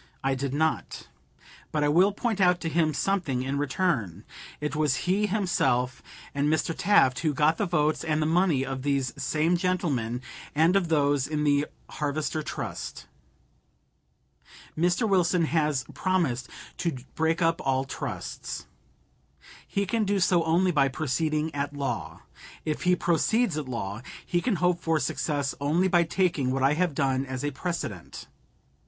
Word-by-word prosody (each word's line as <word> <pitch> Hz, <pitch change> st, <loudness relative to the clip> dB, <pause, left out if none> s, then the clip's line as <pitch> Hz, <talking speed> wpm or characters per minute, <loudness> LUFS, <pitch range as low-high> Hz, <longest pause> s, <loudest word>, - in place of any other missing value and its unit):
I 135 Hz, 0 st, +2 dB
did 135 Hz, 0 st, -2 dB
not. 160 Hz, +3 st, -1 dB, 0.6 s
But 150 Hz, -1 st, 0 dB
I -, -, +3 dB
will 180 Hz, +7 st, +4 dB
point 215 Hz, -1 st, -2 dB
out 180 Hz, -1 st, +4 dB
to 165 Hz, -, -2 dB
him 160 Hz, 0 st, +2 dB
something 145 Hz, -4 st, 0 dB
in 135 Hz, +2 st, -2 dB
return. 135 Hz, -, -1 dB, 0.4 s
It 150 Hz, 0 st, -3 dB
was 150 Hz, -2 st, +1 dB
he 200 Hz, +4 st, +2 dB
himself, 175 Hz, -, 0 dB, 0.3 s
and 140 Hz, 0 st, +1 dB
Mr. 160 Hz, +1 st, +1 dB
Taft, 130 Hz, -11 st, +4 dB
who 155 Hz, -3 st, 0 dB
got 155 Hz, +2 st, +3 dB
the 205 Hz, -, 0 dB
votes 155 Hz, -3 st, +1 dB
and 155 Hz, -2 st, 0 dB
the 155 Hz, -, +1 dB
money 160 Hz, -4 st, +2 dB
of 135 Hz, -1 st, -4 dB
these 140 Hz, -2 st, 0 dB
same 160 Hz, +3 st, +1 dB
gentlemen, 150 Hz, -, -1 dB, 0.3 s
and 165 Hz, +5 st, +4 dB
of 195 Hz, -3 st, +2 dB
those 145 Hz, -4 st, +2 dB
in 150 Hz, -1 st, -1 dB
the 145 Hz, 0 st, +2 dB, 0.2 s
Harvester 150 Hz, +1 st, -2 dB
Trust. -, -, -6 dB, 1.7 s
Mr. 175 Hz, +7 st, +2 dB
Wilson 180 Hz, -3 st, +3 dB
has 150 Hz, -5 st, +1 dB
promised 160 Hz, -10 st, 0 dB, 0.3 s
to 170 Hz, -6 st, -2 dB, 0.2 s
break 160 Hz, +1 st, +1 dB
up 165 Hz, 0 st, +2 dB
all 135 Hz, -1 st, +1 dB
trusts. 135 Hz, -, -5 dB, 1.0 s
He 200 Hz, 0 st, -1 dB
can 220 Hz, +3 st, 0 dB
do 200 Hz, -1 st, +1 dB
so 180 Hz, -2 st, +3 dB
only 175 Hz, +3 st, +3 dB
by 140 Hz, -4 st, +3 dB
proceeding 155 Hz, +3 st, -1 dB
at 145 Hz, 0 st, -3 dB
law. 140 Hz, -1 st, -4 dB, 0.4 s
If 155 Hz, +3 st, -2 dB
he 180 Hz, 0 st, +5 dB
proceeds 180 Hz, +4 st, +1 dB
at 150 Hz, -4 st, -4 dB
law, 105 Hz, -3 st, -4 dB, 0.2 s
he 175 Hz, -, 0 dB
can 240 Hz, -1 st, +1 dB
hope 180 Hz, -1 st, +1 dB
for 165 Hz, -1 st, +1 dB
success 145 Hz, -2 st, -1 dB
only 160 Hz, +6 st, +2 dB
by 175 Hz, -2 st, +3 dB
taking 165 Hz, -6 st, +1 dB
what 130 Hz, 0 st, 0 dB
I 135 Hz, +2 st, +4 dB
have 170 Hz, -1 st, 0 dB
done 135 Hz, -1 st, +1 dB
as 130 Hz, 0 st, -4 dB
a 145 Hz, -, -1 dB
precedent. 135 Hz, -, -5 dB
155 Hz, 160 wpm, -27 LUFS, 140-175 Hz, 1.7 s, he